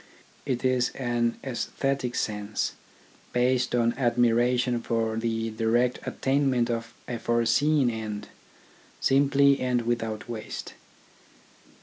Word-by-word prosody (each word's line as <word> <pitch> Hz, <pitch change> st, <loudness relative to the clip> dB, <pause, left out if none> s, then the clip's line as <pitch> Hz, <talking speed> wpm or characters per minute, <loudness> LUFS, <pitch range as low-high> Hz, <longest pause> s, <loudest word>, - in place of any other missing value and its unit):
It 130 Hz, -1 st, -1 dB
is 130 Hz, -1 st, +2 dB
an 120 Hz, -2 st, 0 dB
aesthetic 135 Hz, 0 st, -2 dB
sense, 105 Hz, 0 st, -2 dB, 0.6 s
based 125 Hz, 0 st, +2 dB
on 120 Hz, -1 st, +2 dB
admiration 120 Hz, 0 st, +2 dB
for 115 Hz, -1 st, -1 dB
the 115 Hz, 0 st, -1 dB
direct 120 Hz, +3 st, +1 dB
attainment 135 Hz, -3 st, +1 dB
of 115 Hz, 0 st, -4 dB
a 120 Hz, -2 st, -4 dB
foreseen 120 Hz, +4 st, +2 dB
end, 110 Hz, -2 st, -5 dB, 0.7 s
simply 140 Hz, 0 st, +4 dB
and 125 Hz, -2 st, 0 dB
without 115 Hz, -2 st, -2 dB
waste. 115 Hz, -2 st, -6 dB
120 Hz, 100 wpm, -27 LUFS, 115-130 Hz, 0.7 s, simply